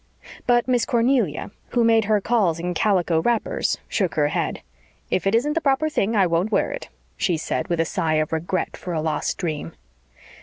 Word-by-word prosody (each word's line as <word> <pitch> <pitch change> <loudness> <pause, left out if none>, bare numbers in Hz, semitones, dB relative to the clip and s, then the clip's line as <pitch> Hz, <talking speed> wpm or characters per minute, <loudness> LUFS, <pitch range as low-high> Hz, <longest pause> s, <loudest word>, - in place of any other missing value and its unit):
But 240 0 +3
Miss 245 -2 +2
Cornelia, 235 - +1 0.2
who 240 - +3
made 225 -1 +4
her 215 0 +3
calls 195 -7 +1
in 175 +1 -2
calico 175 -3 +2
wrappers, 235 +4 0
shook 190 -5 -1
her 145 -1 +2
head. - - -2 0.5
"If 185 - +1
it 200 - +3
isn't 285 +6 +2
the 330 - 0
proper 280 +1 +2
thing 225 -6 0
I 195 -3 +4
won't 175 +5 0
wear - - +1
it," - - -7 0.3
she 175 -3 +1
said, 160 - -2
with 170 -3 -1
a 165 - +3
sigh 160 -2 0
of 155 +1 0
regret 170 +3 -2
for 180 - -6
a 160 - 0
lost 155 0 -1
dream. 155 - -4
195 Hz, 195 wpm, -23 LUFS, 165-235 Hz, 0.5 s, made